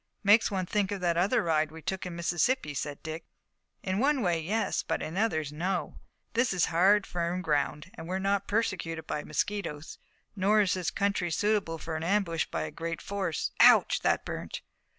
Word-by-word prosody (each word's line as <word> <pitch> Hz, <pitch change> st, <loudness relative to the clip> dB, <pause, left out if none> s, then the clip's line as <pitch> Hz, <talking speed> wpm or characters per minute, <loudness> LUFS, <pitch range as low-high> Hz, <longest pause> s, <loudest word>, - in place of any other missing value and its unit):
"Makes 210 Hz, +3 st, +5 dB
one 190 Hz, -2 st, -2 dB
think 205 Hz, +1 st, 0 dB
of 200 Hz, -, -2 dB
that 175 Hz, -1 st, +1 dB
other 180 Hz, +4 st, +2 dB
ride 155 Hz, -2 st, +1 dB
we 160 Hz, 0 st, -11 dB
took 190 Hz, +2 st, -3 dB
in 175 Hz, -, -6 dB
Mississippi," 170 Hz, -, 0 dB
said 145 Hz, +1 st, -5 dB
Dick. 160 Hz, +1 st, -5 dB, 0.6 s
"In 190 Hz, +1 st, -1 dB
one 275 Hz, 0 st, +2 dB
way, 170 Hz, -3 st, +1 dB
yes, 215 Hz, +8 st, 0 dB
but -, -, -2 dB
in 160 Hz, -, -5 dB
others, 160 Hz, -9 st, 0 dB
no. 180 Hz, +4 st, -2 dB, 0.3 s
This 235 Hz, -2 st, +2 dB
is 180 Hz, -2 st, +2 dB
hard, 195 Hz, +4 st, +4 dB
firm 175 Hz, +1 st, -2 dB
ground, 150 Hz, +2 st, -1 dB
and 160 Hz, -, -9 dB
we're 185 Hz, +2 st, -1 dB
not 200 Hz, +1 st, 0 dB
persecuted 185 Hz, -7 st, -1 dB
by 150 Hz, -, -3 dB
mosquitoes. 155 Hz, -1 st, -3 dB, 0.4 s
Nor 205 Hz, +2 st, +3 dB
is 195 Hz, -, +2 dB
the 185 Hz, -2 st, -3 dB
country 200 Hz, -3 st, 0 dB
suitable 200 Hz, -2 st, 0 dB
for 160 Hz, 0 st, -5 dB
an 160 Hz, -, -5 dB
ambush 170 Hz, -3 st, +1 dB
by 80 Hz, -, -3 dB
a 80 Hz, -, -5 dB
great 165 Hz, 0 st, -4 dB
force. 195 Hz, -5 st, -2 dB
Ouch, -, -, +6 dB
that -, -, +1 dB
burnt!" -, -, -6 dB
180 Hz, 190 wpm, -29 LUFS, 160-200 Hz, 0.6 s, Ouch